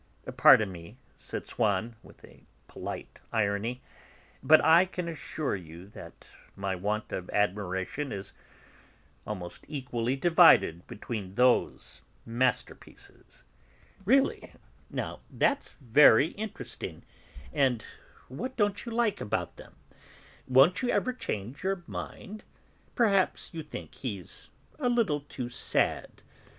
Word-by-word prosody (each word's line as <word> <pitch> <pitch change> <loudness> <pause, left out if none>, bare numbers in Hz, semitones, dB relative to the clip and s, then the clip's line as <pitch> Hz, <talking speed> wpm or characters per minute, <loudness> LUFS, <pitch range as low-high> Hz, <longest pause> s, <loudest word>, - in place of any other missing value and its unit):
"Pardon 105 -3 +6
me," 85 +6 -11 0.2
said - - -7
Swann 110 +1 -1
with - - -16 0.4
polite - - -7
irony, 110 +3 -1 0.6
"but 155 0 +7
I 165 +3 +7
can 180 -2 -5
assure 155 -4 -3
you 85 -1 -10
that - - -12 0.3
my 95 -1 -2
want 105 +4 -3
of 90 -1 -5
admiration 105 +6 -1
is 100 -1 -6 0.9
almost 90 -5 -6
equally 125 -4 -2
divided 160 - +5
between 105 -4 -6
those 125 +1 +1 0.2
masterpieces." 125 +3 -4 0.6
"Really, 265 +7 +2 0.4
now; - - -4
that's 285 - 0
very 135 +2 +5
interesting. 215 +3 -7 0.5
And 130 -7 +1 0.4
what 250 - -6
don't 205 -2 +1
you - - -4
like 230 -2 0
about 105 - -3
them? - - -14 0.7
Won't 135 +8 +5
you 250 - -1
ever 255 - +1
change 120 - -5
your 190 -2 -1
mind? 215 +4 -8 0.5
Perhaps 200 -8 +1
you 165 - -4
think 150 - -9
he's 100 -9 -7 0.3
a 250 -4 +1
little 225 -12 +1
too 140 -3 -7
sad. 125 - -1
130 Hz, 115 wpm, -29 LUFS, -, 0.9 s, but